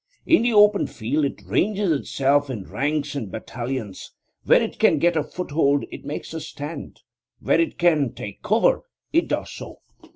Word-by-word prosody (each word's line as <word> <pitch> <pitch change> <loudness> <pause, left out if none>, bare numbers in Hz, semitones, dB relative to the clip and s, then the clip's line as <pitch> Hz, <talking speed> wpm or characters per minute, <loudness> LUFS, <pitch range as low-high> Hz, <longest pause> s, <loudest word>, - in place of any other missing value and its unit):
In 330 - +5
the 240 +1 +2
open 210 -1 +5
field 140 +7 -1
it 140 - -5
ranges 200 -2 +1
itself 140 -1 +1
in 115 -7 -4
ranks 145 +5 -2
and 125 -8 -4
battalions; 115 -2 -6 0.3
where - - +6
it - - -4
can - - +4
get 175 0 +2
a 155 - +1
foothold 145 -4 0
it - - -9
makes 150 - -6
a 160 - -4
stand; 150 +1 -8 0.4
where - - +2
it 330 - -2
can 155 -7 +3
take 100 -1 -8
cover 235 - +2 0.3
it 335 +2 +3
does - - -2
so. - - -9
150 Hz, 170 wpm, -23 LUFS, 135-180 Hz, 0.4 s, where